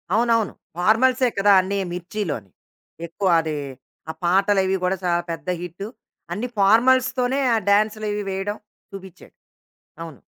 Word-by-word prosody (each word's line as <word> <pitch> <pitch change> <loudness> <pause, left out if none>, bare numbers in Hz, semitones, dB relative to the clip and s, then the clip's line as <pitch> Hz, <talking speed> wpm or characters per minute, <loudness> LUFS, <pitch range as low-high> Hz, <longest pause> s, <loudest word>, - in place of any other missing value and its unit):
అవునవును. 230 -2 +2 0.2
ఫార్మల్సే 245 +7 +3
కదా! 200 +1 +4
అన్నీ 195 +2 -3 0.2
మిర్చీలోని. 175 - -5 0.6
ఎక్కువ 190 +4 -3
అది, 160 -1 -4 0.5
ఆ - - -1
పాటలవి 195 +1 +2
గూడా 185 +1 0
చాలా 175 -1 +1
పెద్ద 165 0 -7
హిట్టు. 180 +3 -7 0.5
అన్ని 215 +7 -3
ఫార్మల్స్‌తోనే 250 +5 +3 0.2
ఆ - - +2
డ్యాన్సులవి 210 0 +1
వేయడం 195 +2 -3 0.3
చూపిచ్చాడు. 190 -2 -12 0.7
అవును. 165 -4 -9
200 Hz, 115 wpm, -22 LUFS, 180-220 Hz, 0.7 s, కదా